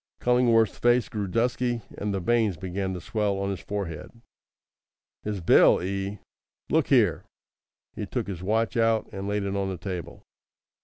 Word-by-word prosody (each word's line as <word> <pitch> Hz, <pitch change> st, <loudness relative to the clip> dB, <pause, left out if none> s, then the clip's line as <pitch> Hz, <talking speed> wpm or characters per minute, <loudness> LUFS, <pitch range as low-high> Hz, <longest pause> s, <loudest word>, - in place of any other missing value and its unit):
Cullingworth's 120 Hz, -3 st, +3 dB
face 120 Hz, 0 st, +3 dB
grew 105 Hz, -2 st, -3 dB
dusky, 120 Hz, +2 st, 0 dB
and 105 Hz, 0 st, -3 dB
the 100 Hz, -, -1 dB
veins 110 Hz, -1 st, +1 dB
began 95 Hz, +2 st, -3 dB
to -, -, -5 dB
swell 105 Hz, 0 st, -1 dB
on 100 Hz, 0 st, -1 dB
his 95 Hz, -, -4 dB
forehead. 95 Hz, -6 st, -5 dB, 1.1 s
"His 105 Hz, -3 st, -4 dB
bill, 85 Hz, -, +6 dB
eh! 100 Hz, +2 st, -3 dB, 0.5 s
Look -, -, +3 dB
here!" -, -, +3 dB, 0.7 s
He -, -, -4 dB
took -, -, -2 dB
his 95 Hz, -3 st, -6 dB
watch 110 Hz, +5 st, 0 dB
out 115 Hz, -1 st, +2 dB
and 95 Hz, 0 st, -5 dB
laid 105 Hz, 0 st, -1 dB
it 100 Hz, 0 st, -2 dB
on 100 Hz, -1 st, -1 dB
the 95 Hz, -, -4 dB
table. 90 Hz, -1 st, -6 dB
100 Hz, 160 wpm, -26 LUFS, 95-115 Hz, 1.1 s, bill